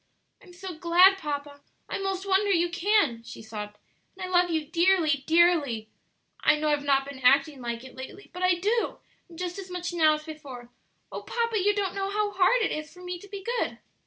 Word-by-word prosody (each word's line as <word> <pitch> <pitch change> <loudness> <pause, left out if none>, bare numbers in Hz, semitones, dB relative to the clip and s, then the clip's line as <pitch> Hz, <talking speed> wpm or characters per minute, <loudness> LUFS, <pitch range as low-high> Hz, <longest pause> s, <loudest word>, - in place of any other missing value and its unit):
"I'm 370 - -16
so 360 -2 -8
glad, 360 +3 +5
papa; 285 -3 -5 0.3
I - - -4
'most 390 0 -3
wonder 390 +1 +2
you 345 -2 +2
can," 350 - +2
she 230 -1 -11
sobbed; 210 -1 -7 0.4
"and 380 - -7
I - - -3
love 355 0 +4
you 320 -2 -1
dearly, 330 -3 +2
dearly; 320 -10 +3 0.5
I - - +4
know 305 0 0
I've 295 -1 +1
not 275 -1 +2
been 280 -1 -9
acting 275 +2 +3
like 235 0 -4
it 260 - -12
lately, 265 +10 -10
but 360 - -7
I 365 -1 +4
do, 425 +6 0 0.3
and 335 - -13
just 360 +1 -4
as 380 -1 -8
much 355 -1 -4
now 315 -3 +4
as 305 - -8
before. 280 -6 -10 0.4
Oh, - - -5
papa, 465 -2 -1
you 410 +2 +2
don't 390 -3 -1
know 390 0 -2
how 415 0 -1
hard 405 +5 +3
it - - 0
is 305 0 -5
for 360 - -14
me 360 -1 -5
to 405 - -13
be 400 -1 -8 0.2
good!" - - -2
345 Hz, 215 wpm, -27 LUFS, 285-385 Hz, 0.5 s, glad